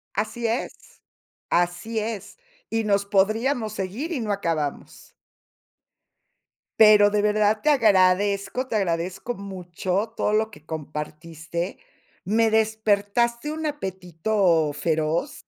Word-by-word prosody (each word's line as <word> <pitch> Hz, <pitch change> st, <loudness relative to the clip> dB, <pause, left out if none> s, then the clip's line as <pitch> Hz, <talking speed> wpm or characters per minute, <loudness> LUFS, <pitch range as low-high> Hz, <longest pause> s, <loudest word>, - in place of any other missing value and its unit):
Así 220 Hz, +4 st, -2 dB
es, 230 Hz, +3 st, -5 dB, 0.5 s
así 175 Hz, +6 st, 0 dB
es, 220 Hz, -, -5 dB, 0.3 s
y 225 Hz, 0 st, 0 dB
nos 200 Hz, -1 st, +1 dB
podríamos 215 Hz, +4 st, +1 dB
seguir 215 Hz, -, -4 dB
y 285 Hz, -, -2 dB
no 215 Hz, -2 st, -1 dB
acabamos. 165 Hz, -7 st, -4 dB, 1.6 s
Pero 210 Hz, -1 st, +7 dB
de 210 Hz, 0 st, +1 dB
verdad, 210 Hz, 0 st, +2 dB
te 305 Hz, -, +3 dB
agradezco, 200 Hz, -1 st, +3 dB
te 230 Hz, -, -2 dB
agradezco 185 Hz, +4 st, -2 dB
mucho 195 Hz, +1 st, -4 dB
todo 210 Hz, -, 0 dB
lo 220 Hz, +1 st, +1 dB
que 155 Hz, -8 st, -16 dB
compartiste. 160 Hz, +2 st, -5 dB, 0.5 s
Me 225 Hz, +3 st, +2 dB
despertaste 220 Hz, +3 st, +1 dB
un 315 Hz, 0 st, -3 dB
apetito 185 Hz, -, 0 dB
feroz. 160 Hz, -, -1 dB
205 Hz, 110 wpm, -24 LUFS, 175-220 Hz, 1.6 s, Pero